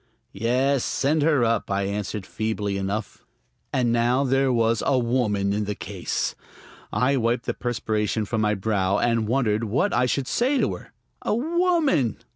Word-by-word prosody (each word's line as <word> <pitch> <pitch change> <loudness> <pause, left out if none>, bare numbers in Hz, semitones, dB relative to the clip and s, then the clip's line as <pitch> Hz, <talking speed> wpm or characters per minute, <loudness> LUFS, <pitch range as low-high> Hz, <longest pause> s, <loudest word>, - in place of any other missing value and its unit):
"Yes, 125 +5 +1
send 150 +3 +1
her 145 -5 +3
up," 115 -2 0
I 100 0 0
answered 100 0 -3
feebly 110 -2 -2
enough. 100 +2 -4 0.5
And 125 -2 +1
now 120 +3 +2
there 135 0 +2
was 115 -2 +2
a 135 - +2
woman 115 -5 +1
in 105 0 -1
the 105 0 -3
case! - - -3 0.6
I 135 +2 +2
wiped 120 0 0
the - - -1
perspiration 110 -3 -1
from 110 +1 -1
my 105 0 +2
brow 100 -1 0
and 115 -2 +1
wondered 115 -3 +1
what 125 - 0
I 125 - +2
should 130 +1 -1
say 260 +4 +1
to - - +1
her. - - -10 0.3
A - - 0
woman.... 315 - +1
115 Hz, 165 wpm, -24 LUFS, 105-135 Hz, 0.6 s, her